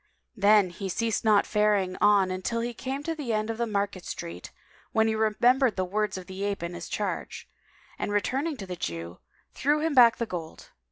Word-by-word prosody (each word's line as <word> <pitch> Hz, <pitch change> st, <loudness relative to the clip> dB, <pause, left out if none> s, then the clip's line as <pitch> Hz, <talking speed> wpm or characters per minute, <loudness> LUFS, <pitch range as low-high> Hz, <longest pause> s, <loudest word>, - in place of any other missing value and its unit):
Then 205 Hz, -3 st, +4 dB
he 190 Hz, +2 st, -5 dB
ceased 225 Hz, +3 st, -1 dB
not 210 Hz, -2 st, +4 dB
faring 210 Hz, -3 st, +1 dB
on 195 Hz, -3 st, +3 dB
till 230 Hz, +4 st, -1 dB
he 240 Hz, +1 st, -3 dB
came 270 Hz, +4 st, -5 dB
to 330 Hz, -, -2 dB
the 285 Hz, -8 st, -3 dB
end 215 Hz, +1 st, 0 dB
of 225 Hz, -, -7 dB
the 235 Hz, -, 0 dB
market 200 Hz, -3 st, -2 dB
street, 85 Hz, +2 st, -7 dB, 0.4 s
when 220 Hz, 0 st, +3 dB
he 220 Hz, -, +1 dB
remembered 230 Hz, +3 st, +3 dB
the 185 Hz, -, -1 dB
words 205 Hz, +1 st, -1 dB
of 185 Hz, -, -8 dB
the 190 Hz, +2 st, -6 dB
ape 200 Hz, -3 st, -2 dB
and 170 Hz, +1 st, -4 dB
his 175 Hz, -1 st, -7 dB
charge, 210 Hz, -, -4 dB, 0.5 s
and -, -, -2 dB
returning 270 Hz, +9 st, -1 dB
to 195 Hz, -, -7 dB
the 180 Hz, -1 st, -5 dB
Jew, 85 Hz, -, -5 dB, 0.3 s
threw 295 Hz, +4 st, +1 dB
him 320 Hz, 0 st, 0 dB
back 240 Hz, -4 st, +7 dB
the 235 Hz, -, -1 dB
gold. 170 Hz, -6 st, -8 dB
210 Hz, 205 wpm, -27 LUFS, 185-235 Hz, 0.5 s, back